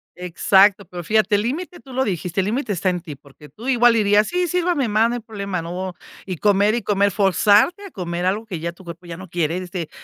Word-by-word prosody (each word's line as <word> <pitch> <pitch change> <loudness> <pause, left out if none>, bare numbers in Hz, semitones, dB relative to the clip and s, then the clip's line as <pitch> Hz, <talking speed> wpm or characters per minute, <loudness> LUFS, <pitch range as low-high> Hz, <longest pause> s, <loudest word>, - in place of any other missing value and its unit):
Exacto, 190 +3 +3
pero 175 0 -8
fíjate, 215 +2 +2
el 205 - +1
límite 335 +9 -4
tú 265 -2 -13
lo 260 - +1
dijiste, 180 -3 -2
el - - -2
límite 220 +1 -1
está 185 +1 0
en 180 -1 -2
ti, 160 -4 -9
porque 140 +2 -17
tú 225 - -11
igual 240 -2 +4
dirías: 210 -1 +3
"Sí, 360 0 0
sírvame, 345 -6 0
más, 220 +2 +2
no 240 - -2
hay - - -3
problema", 200 -5 -5
no, 180 +2 -5 0.3
y 185 -3 -5
comer, 205 +2 +3
y 240 - -1
comer, 200 0 +1
forzarte 205 - +3
a 390 - -10
comer 175 - -4
algo 205 +4 -1
que 180 -6 -5
ya 170 +2 -3
tu 170 +2 -17
cuerpo 170 0 -10
ya 170 - -7
no 185 -1 -11
quiere, 170 0 -1
este, 180 -3 -5
200 Hz, 240 wpm, -21 LUFS, 180-225 Hz, 0.3 s, igual